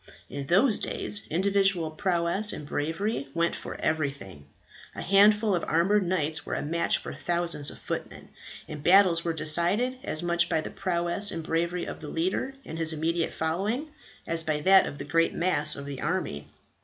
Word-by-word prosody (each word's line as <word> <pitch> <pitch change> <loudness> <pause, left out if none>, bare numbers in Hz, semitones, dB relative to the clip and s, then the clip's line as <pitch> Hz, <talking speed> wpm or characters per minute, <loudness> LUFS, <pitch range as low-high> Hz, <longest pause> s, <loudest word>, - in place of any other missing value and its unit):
In 140 -1 -5
those 205 - +4
days 205 -1 -2
individual 190 -2 +1
prowess 175 +4 0
and 150 - -7
bravery 160 +3 -2
went 170 0 +1
for - - -7
everything. 140 - -3 0.5
A - - -5
handful 205 +2 +5
of 175 - 0
armoured 185 +4 +2
knights 155 -4 -1
were - - -4
a - - -3
match 170 +3 +1
for - - -7
thousands 170 -4 -1
of - - -10
footmen, - - -6 0.4
and 150 -1 -7
battles 180 -2 +5
were 170 - 0
decided 170 +11 0
as 155 - -3
much 170 0 +1
by 160 - +1
the - - -5
prowess 175 +3 -1
and 165 - -4
bravery 170 +2 -1
of - - -7
the 150 - -8
leader 190 +11 -2
and 165 - -7
his 160 -1 0
immediate 165 +2 -1
following 200 - -2 0.4
as 165 0 -1
by 155 -1 -1
that 190 +4 +6
of 145 - -7
the - - -6
great 165 +3 +1
mass 155 -4 +3
of 140 - -7
the 140 -2 -6
army. 150 - -2
170 Hz, 180 wpm, -27 LUFS, 155-190 Hz, 0.5 s, that